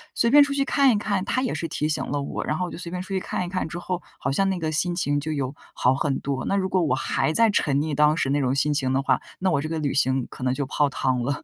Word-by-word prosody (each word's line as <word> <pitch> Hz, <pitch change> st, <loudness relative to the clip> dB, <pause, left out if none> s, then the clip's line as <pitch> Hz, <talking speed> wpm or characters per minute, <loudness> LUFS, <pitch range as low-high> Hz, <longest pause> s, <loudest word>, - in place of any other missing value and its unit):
随 235 Hz, -, +3 dB
便 290 Hz, +3 st, +8 dB
出 280 Hz, 0 st, -1 dB
去 275 Hz, -1 st, +1 dB
看 275 Hz, -2 st, +4 dB
一 220 Hz, -, +2 dB
看， 200 Hz, -3 st, -1 dB
他 255 Hz, -, 0 dB
也 255 Hz, -, -1 dB
是 165 Hz, +2 st, -3 dB
提 150 Hz, 0 st, -2 dB
醒 155 Hz, -, 0 dB
了 145 Hz, 0 st, -2 dB
我， 140 Hz, -, -4 dB
然 150 Hz, -, -1 dB
后 180 Hz, -, -1 dB
我 -, -, -8 dB
就 -, -, -7 dB
随 170 Hz, -1 st, -6 dB
便 180 Hz, 0 st, -3 dB
出 190 Hz, -, -13 dB
去 195 Hz, -, 0 dB
看 180 Hz, -, -3 dB
一 -, -, -6 dB
看， 185 Hz, -2 st, -2 dB
之 170 Hz, +2 st, -6 dB
后 180 Hz, 0 st, -3 dB, 0.2 s
好 135 Hz, -, -1 dB
像 195 Hz, +7 st, +2 dB
那 185 Hz, -2 st, -1 dB
个 155 Hz, -1 st, -2 dB
心 175 Hz, +3 st, +1 dB
情 145 Hz, -4 st, +1 dB
就 155 Hz, +2 st, -4 dB
有 140 Hz, -1 st, -3 dB, 0.2 s
好 125 Hz, -, +3 dB
很 140 Hz, -1 st, -1 dB
多。 135 Hz, -1 st, -3 dB
那 195 Hz, -, 0 dB
如 190 Hz, -1 st, 0 dB
果 185 Hz, -1 st, +2 dB
我 150 Hz, -, +1 dB
还 160 Hz, -, 0 dB
在 230 Hz, +3 st, +5 dB
沉 145 Hz, -8 st, +1 dB
溺 155 Hz, 0 st, -2 dB
当 150 Hz, +1 st, +4 dB
时 135 Hz, -, 0 dB
那 145 Hz, +1 st, +1 dB
种 130 Hz, -1 st, +1 dB
心 150 Hz, +1 st, +2 dB
情 130 Hz, -2 st, 0 dB
的 135 Hz, -, +2 dB
话， 135 Hz, -, +1 dB, 0.2 s
那 185 Hz, 0 st, +1 dB
我 140 Hz, -3 st, +1 dB
这 155 Hz, -, -4 dB
个 165 Hz, 0 st, -2 dB
旅 145 Hz, -3 st, -1 dB
行 130 Hz, -2 st, +1 dB
可 -, -, -9 dB
能 130 Hz, 0 st, +1 dB
就 140 Hz, 0 st, -2 dB
泡 145 Hz, +1 st, +1 dB
汤 130 Hz, -2 st, -1 dB
了， 140 Hz, +3 st, -3 dB
155 Hz, 345 characters per minute, -24 LUFS, 140-185 Hz, 0.2 s, 便